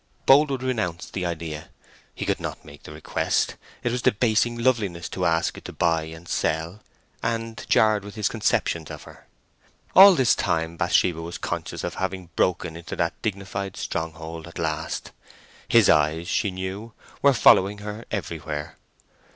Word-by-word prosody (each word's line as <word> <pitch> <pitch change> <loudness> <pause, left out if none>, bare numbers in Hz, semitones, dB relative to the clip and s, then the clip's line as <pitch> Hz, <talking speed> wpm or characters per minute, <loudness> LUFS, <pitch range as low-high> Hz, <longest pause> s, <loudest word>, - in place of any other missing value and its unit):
Boldwood 135 -1 +5
renounced 100 -10 -2
the 90 -2 -2
idea. 80 -2 -5 0.5
He - - -4
could - - 0
not - - -6
make 75 0 -13
the - - -11
request; 75 +1 -1 0.3
it 120 - 0
was 125 +1 -1
debasing 115 +2 +2
loveliness 110 -9 0
to - - -2
ask 80 +1 0
it - - -24
to - - -6
buy 80 -2 +1
and 80 +2 -11
sell, 80 +6 -1 0.4
and 115 0 -3
jarred 110 -2 +4
with 105 +1 -10
his 105 -2 0
conceptions 80 -2 0
of - - -8
her. - - -15 0.7
All 195 0 +10
this 130 -7 +4
time 80 0 -1
Bathsheba 85 0 +2
was 85 +1 -6
conscious - - -4
of - - -3
having 95 -2 -3
broken 85 -2 0
into 85 0 -7
that 85 -1 -2
dignified 100 -2 -4
stronghold 80 0 -5
at 85 - -11
last. 80 -2 -3 0.6
His - - +5
eyes, 75 +3 +3
she 100 - +1
knew, 95 +4 -6 0.3
were 140 - +6
following 100 -4 +5
her 105 +2 -7
everywhere. 80 -6 -5
90 Hz, 160 wpm, -24 LUFS, 80-110 Hz, 0.7 s, All